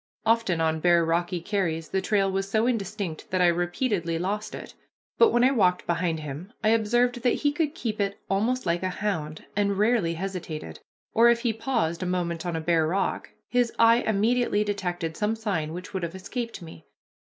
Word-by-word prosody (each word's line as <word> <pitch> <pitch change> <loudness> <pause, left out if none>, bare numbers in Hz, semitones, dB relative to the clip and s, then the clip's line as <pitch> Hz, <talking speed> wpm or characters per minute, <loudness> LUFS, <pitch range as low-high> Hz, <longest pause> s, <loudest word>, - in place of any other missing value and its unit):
Often 225 -7 +2
on 160 0 +1
bare 170 0 +4
rocky 175 +2 0
carries 170 -4 -2
the 190 - 0
trail 195 0 +1
was 195 +1 -2
so 220 +3 +2
indistinct 200 -8 -3
that 185 - 0
I 180 - +5
repeatedly 175 0 0
lost 205 +5 -3
it, - - -9 0.5
but 460 - +7
when 240 - +3
I 260 - +5
walked 185 -8 +2
behind 170 -2 -1
him 150 - -7
I 215 - +4
observed 240 +2 +2
that 245 - +2
he 290 - +5
could 295 0 -1
keep 215 -3 -3
it 200 0 -1
almost 225 +6 0
like 170 0 0
a 185 - -1
hound, 170 -6 -3
and 200 -1 +1
rarely 210 -6 +2
hesitated, 165 - -5 0.3
or, 235 +1 +6
if 235 0 +3
he 235 -2 +1
paused 195 -8 -1
a 185 - -2
moment 175 -1 -2
on 170 - -2
a 160 - -2
bare 160 -1 +2
rock, 190 +4 -1 0.2
his 245 -1 +1
eye 230 0 +6
immediately 220 0 +1
detected 175 -5 -3
some 210 +1 0
sign 195 -9 -2
which 180 +4 -8
would 190 - -2
have 170 +1 -4
escaped 230 +1 -5
me. 125 - -12
195 Hz, 195 wpm, -26 LUFS, 170-225 Hz, 0.5 s, but